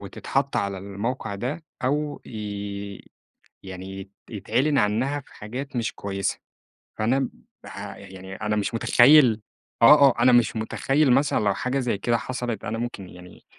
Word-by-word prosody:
وتتحط 135 +7 -2
على 100 -1 -1
الموقع 100 +3 -4
ده 130 +10 -4 0.2
أو 145 +2 -1
ي 100 -2 -6 0.5
يعني 95 0 -8
يت 95 0 -11 0.2
يتعلن 130 +8 0
عنّها 125 +8 +1
في - - -20
حاجات 125 +6 -7
مش 115 -3 -1
كويسة. 100 -1 -3 0.6
فأنا 120 +5 +2
م 135 - -1 0.3
بها - - -8
ي - - -12
يعني 95 +1 -9
أنا 105 0 -2
مش 105 +3 -1
مُتخيّل 120 -1 +6 0.4
آه، 140 +3 +9
آه. 120 - -2
أنا 125 +1 +6
مش 120 -2 +3
مُتخيّل 135 +5 +1
مثلًا 140 +3 +3
لو 100 -1 +2
حاجة 125 +6 -1
زي 120 -6 -1
كده 120 +4 +1
حصلت 120 -2 -4
أنا 110 +2 -3
ممكن 115 -6 -5
يعني 90 0 -14
115 Hz, 160 wpm, -24 LUFS, 100-130 Hz, 0.6 s, آه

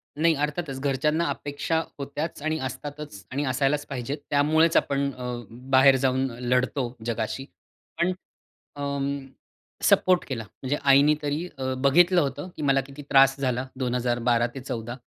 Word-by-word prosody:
नाही. 160 +2 +3
अर्थातच 150 -1 -2
घरच्यांना 150 +4 +1
अपेक्षा 145 +3 -2 0.2
होत्याच, 145 +3 -4
आणि 155 0 0
असतातच, 145 -7 -8
आणि 140 +3 -1
असायलाच 140 +3 +1
पाहिजेत. 135 +1 -4
त्यामुळेच 155 +3 +3
आपण 140 0 +1
अ, 125 -1 -5 0.2
बाहेर 130 +3 +4
जाऊन 130 +1 +2 0.2
लढतो 125 +1 0
जगाशी. 115 +3 -3 0.6
पण 175 +2 +3 0.7
अं, 140 -1 -2 0.6
सपोर्ट 180 -1 +4
केला. 115 -5 -3 0.2
म्हणजे 135 +3 0
आईनी 140 +3 +6
तरी 150 +4 -2
अ, 130 0 -2
बघितलं 175 +7 +5
होतं 145 +4 -3
की 155 - -6
मला 135 -1 +3
किती 140 +1 -10
त्रास 135 0 +6
झाला 130 -1 -1
दोन 125 -2 -1
हजार 120 -1 0
12 120 0 +4
ते 135 - -6
14 120 -1 -5
140 Hz, 145 wpm, -25 LUFS, 130-150 Hz, 0.7 s, आईनी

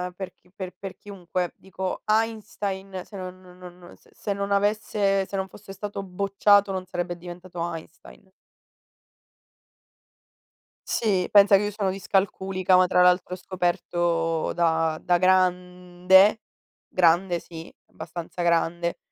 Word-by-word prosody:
per 190 0 -7
chi - - -30
per 185 -2 -6
per 195 -1 -7
chiunque. 185 -3 -4
Dico 190 -1 -5
Einstein 205 -3 -2
se 205 - -11
non 185 0 -8
non 180 -1 -17 0.2
non 175 0 -14
se 205 - -7
non 200 0 -2
avesse 200 -1 +1
se 200 - -7
non 190 0 -2
fosse 195 0 -12
stato 200 +1 -5
bocciato 200 +1 +2
non 185 -1 -4
sarebbe 175 -1 -4
diventato 175 0 -10 0.2
Einstein. 165 +3 -13 2.6
Sì, 195 -6 +1
pensa 200 -1 +7
che 195 - +3
io 205 - -2
sono 200 -2 -1
discalculica, 190 -1 0
ma 185 0 +5
tra 180 - +3
l'altro 180 0 +3
ho - - -12
scoperto 175 -2 -1
da 160 -2 +1
da 175 -1 +2
grande. 180 +2 +3 0.5
Grande 175 0 +3
sì, 165 0 -11 0.2
abbastanza 170 +2 -7
grande, 170 0 +1
185 Hz, 130 wpm, -25 LUFS, 175-195 Hz, 2.6 s, pensa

